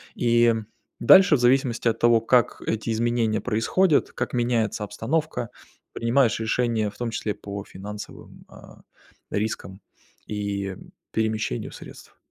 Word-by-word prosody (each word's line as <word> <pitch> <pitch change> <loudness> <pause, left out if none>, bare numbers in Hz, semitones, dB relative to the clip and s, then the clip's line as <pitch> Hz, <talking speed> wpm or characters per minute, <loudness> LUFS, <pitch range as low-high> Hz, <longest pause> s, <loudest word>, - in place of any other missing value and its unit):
И 120 -1 +3 0.5
дальше, 185 +6 +7
в - - 0
зависимости 125 -1 +2
от 115 - -2
того, 115 -1 +4
как 120 0 +2
эти 110 +1 -2
изменения 115 -1 0
происходят, 150 - +1
как - - -3
меняется 120 -4 0
обстановка, 125 +3 -2 0.4
принимаешь 115 -1 +2
решения, 110 -1 0
в - - -15
том 120 -1 -2
числе, 110 -1 -2
по 100 0 -7
финансовым, 105 +2 -10
а, - - -15 0.5
рискам 100 -2 -3 0.5
и 100 -2 -3 0.4
перемещению 110 - -2
средств. - - -13
115 Hz, 120 wpm, -24 LUFS, 105-120 Hz, 0.5 s, дальше